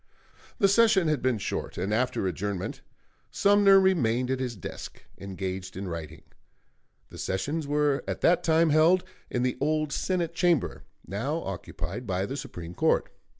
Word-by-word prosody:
The 200 Hz, -, +4 dB
session 200 Hz, -3 st, +4 dB
had 150 Hz, -4 st, 0 dB
been 130 Hz, -3 st, +1 dB
short, 100 Hz, -, -4 dB
and 95 Hz, +4 st, -1 dB
after 125 Hz, -3 st, 0 dB
adjournment 95 Hz, +1 st, -3 dB, 0.5 s
Sumner 200 Hz, -1 st, +5 dB
remained 130 Hz, -10 st, +2 dB
at 130 Hz, -, -1 dB
his 125 Hz, -3 st, -3 dB
desk, 95 Hz, -, -8 dB, 0.2 s
engaged 95 Hz, -1 st, -5 dB
in 95 Hz, 0 st, -4 dB
writing. 80 Hz, -2 st, -7 dB, 0.9 s
The -, -, -10 dB
sessions 145 Hz, +11 st, -2 dB
were 145 Hz, -1 st, +1 dB
at -, -, -4 dB
that 175 Hz, +1 st, +3 dB
time 165 Hz, -1 st, +3 dB
held 165 Hz, +4 st, +5 dB, 0.3 s
in 125 Hz, -, -1 dB
the 125 Hz, 0 st, -1 dB
old 155 Hz, 0 st, 0 dB
Senate 175 Hz, -3 st, -1 dB
Chamber, 175 Hz, -5 st, +1 dB, 0.2 s
now 135 Hz, -, -3 dB
occupied 95 Hz, +3 st, -6 dB
by 95 Hz, 0 st, -1 dB
the 135 Hz, -, -5 dB
Supreme 90 Hz, -, -7 dB
Court. -, -, +1 dB
130 Hz, 150 wpm, -27 LUFS, -, 0.9 s, Sumner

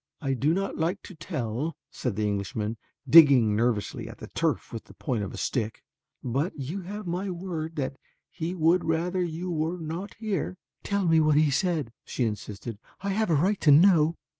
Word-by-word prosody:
"I 135 Hz, -3 st, -1 dB
do 140 Hz, +4 st, +1 dB
not 195 Hz, -2 st, -2 dB
like 175 Hz, +5 st, -1 dB
to -, -, -10 dB
tell," 140 Hz, -1 st, -3 dB, 0.2 s
said 125 Hz, -6 st, -3 dB
the 105 Hz, +1 st, 0 dB
Englishman, 105 Hz, +2 st, -2 dB, 0.3 s
digging 130 Hz, -7 st, +7 dB
nervously 115 Hz, -2 st, -1 dB
at -, -, -10 dB
the -, -, -10 dB
turf -, -, -1 dB
with -, -, -6 dB
the -, -, -16 dB
point 115 Hz, -5 st, -2 dB
of 100 Hz, -, -5 dB
a -, -, -8 dB
stick, 115 Hz, -4 st, -2 dB, 0.4 s
"but 140 Hz, +9 st, -1 dB
you 150 Hz, +8 st, -4 dB
have 205 Hz, +3 st, -7 dB
my 180 Hz, +3 st, -2 dB
word 170 Hz, -3 st, -4 dB
that 135 Hz, -1 st, -3 dB, 0.3 s
he 170 Hz, +3 st, -4 dB
would 170 Hz, +1 st, +3 dB
rather 170 Hz, +3 st, 0 dB
you 175 Hz, +1 st, -3 dB
were 165 Hz, +2 st, -1 dB
not 175 Hz, +4 st, -5 dB
here." 205 Hz, -4 st, -3 dB, 0.2 s
"Tell 200 Hz, -1 st, -1 dB
me 165 Hz, -1 st, +5 dB
what 155 Hz, -1 st, +4 dB
he 155 Hz, -1 st, +4 dB
said," 150 Hz, -5 st, 0 dB
she 125 Hz, -, -2 dB
insisted, 105 Hz, 0 st, -5 dB, 0.2 s
"I 200 Hz, -, -2 dB
have 215 Hz, +1 st, 0 dB
a 165 Hz, -, +4 dB
right 190 Hz, +8 st, +1 dB
to 155 Hz, -, +4 dB
know." 160 Hz, +1 st, +6 dB
160 Hz, 190 wpm, -27 LUFS, 125-180 Hz, 0.4 s, digging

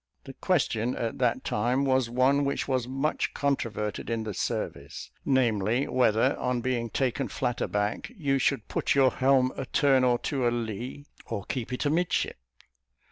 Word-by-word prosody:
The 135 Hz, -, -9 dB
question 125 Hz, -, 0 dB
at 115 Hz, +1 st, -3 dB
that 125 Hz, -3 st, +1 dB
time 125 Hz, +6 st, 0 dB
was 130 Hz, -3 st, +2 dB
one 130 Hz, +4 st, +3 dB
which 140 Hz, 0 st, -1 dB
was 130 Hz, -3 st, 0 dB
much 135 Hz, +4 st, -1 dB
controverted 115 Hz, -8 st, -2 dB
in 115 Hz, -1 st, -1 dB
the 110 Hz, -1 st, -4 dB
service; 70 Hz, -5 st, -4 dB
namely, 120 Hz, -2 st, +2 dB
whether, 125 Hz, +1 st, +3 dB
on 125 Hz, -1 st, 0 dB
being 120 Hz, -1 st, -1 dB
taken 130 Hz, +2 st, -1 dB
flat 125 Hz, -2 st, -2 dB
aback, 105 Hz, -, -1 dB
you 140 Hz, -5 st, +1 dB
should 130 Hz, -3 st, 0 dB
put -, -, 0 dB
your 135 Hz, -2 st, +5 dB
helm 130 Hz, -1 st, +3 dB
a 135 Hz, -, -5 dB
turn 135 Hz, -1 st, +3 dB
or 125 Hz, -1 st, +3 dB
two 125 Hz, 0 st, -1 dB
alee, 120 Hz, +4 st, -3 dB, 0.2 s
or 105 Hz, -4 st, -4 dB
keep 125 Hz, +1 st, -4 dB
it 125 Hz, -, -2 dB
amidship? 165 Hz, +4 st, 0 dB
125 Hz, 160 wpm, -27 LUFS, 115-135 Hz, 0.2 s, your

